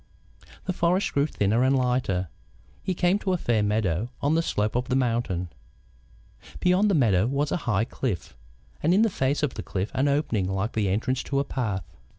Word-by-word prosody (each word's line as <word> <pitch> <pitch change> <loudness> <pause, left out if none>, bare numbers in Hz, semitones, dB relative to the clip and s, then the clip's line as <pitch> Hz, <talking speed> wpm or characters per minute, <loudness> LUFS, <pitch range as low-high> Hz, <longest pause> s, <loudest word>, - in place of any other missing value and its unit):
The 185 - -1
forest 180 +3 +1
grew 140 +1 +2
thinner 110 -3 +1
and 135 +1 +3
lighter. 125 -8 0 0.5
He 185 - -2
came 180 +3 +2
to 190 -3 -1
a - - +1
fair 120 -9 +1
meadow 105 0 0
on 145 +2 +1
the 165 - +3
slope 105 -9 -1
of 125 +2 -1
the 130 - +1
mountain. 115 -9 0 1.1
Beyond 185 +4 +3
the 195 - +3
meadow 110 - +3
was 140 +3 0
a - - +1
high 105 0 +2
cliff, 110 - -4 0.5
and 170 +4 +3
in 210 - +5
the 225 - +2
face 140 -1 0
of 145 - 0
the - - -5
cliff 95 +2 -3
an 135 +2 +1
opening 130 -10 0
like 95 +3 -1
the 105 -3 0
entrance 120 +6 0
to 140 - -1
a - - +2
path. 105 - -3
125 Hz, 195 wpm, -26 LUFS, 105-150 Hz, 1.1 s, in